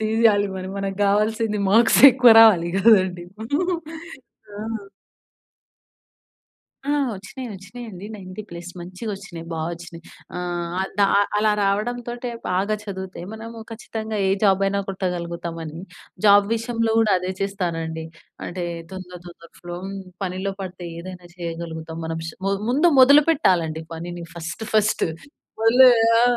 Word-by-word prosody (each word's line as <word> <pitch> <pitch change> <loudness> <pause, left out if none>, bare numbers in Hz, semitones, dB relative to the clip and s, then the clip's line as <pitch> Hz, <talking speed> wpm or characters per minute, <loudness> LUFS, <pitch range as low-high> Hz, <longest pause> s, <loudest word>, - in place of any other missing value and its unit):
తీయాలి 220 -2 +3
మరి 185 0 -5
మనకు 195 -1 -3
గావాల్సింది 210 +1 +1
మార్క్స్ 225 +3 +5
ఎక్కువ 250 -2 +6
రావాలి 190 -7 +6
గదండి. 185 -4 +4 1.3
ఆ! - - -6 2.3
ఆ! - - +2 0.3
వచ్చినాయి 240 +6 -8
వచ్చినాయండి. 200 0 -9
90 190 0 -8
ప్లస్ 170 +1 -8
మంచిగా 185 +5 -6
వచ్చినాయి 175 -4 -9
బాగా 160 0 -2
వచ్చినాయి. 170 0 -11 0.4
ఆహ్, 175 +1 -3
ద - - +3 0.4
అలా 215 0 +3
రావడంతోటే 240 +4 -2 0.2
బాగా 195 +4 0
చదివితే 190 -3 -7
మనము 225 +1 -8
ఖచ్చితంగా 220 -1 -5
ఏ - - +2
జాబ్ 195 -1 +4
అయినా 200 0 0
కొట్టగలుగుతామని 170 -3 -4 0.5
జాబ్ 200 0 +7
విషయంలో 230 -1 -1
గూడా 220 -2 +3
అదే 185 +1 -3
చేస్తానండి. 165 -5 -3 0.4
అంటే 175 0 -4 0.3
తొందర 180 -1 -8
తొందర 170 -1 -15
ఫ్లో 175 0 -7
హ్మ్. 195 0 -6 0.3
పనిలో 190 +2 -3
పడితే 185 -1 -7
ఏదైనా 180 0 -9
చేయగలుగుతాం 165 -1 -6
మనం 165 0 -3
ష - - -4 0.4
ముందు 295 +7 +3
మొదలుపెట్టాలండి 255 - +4
పనిని 175 +1 -6
ఫస్ట్ 170 +6 -6
ఫస్ట్ 215 -3 +2 0.6
వదిలే 250 +3 +7 0.3
ఆ! - - +4
190 Hz, 120 wpm, -22 LUFS, 175-220 Hz, 2.3 s, జాబ్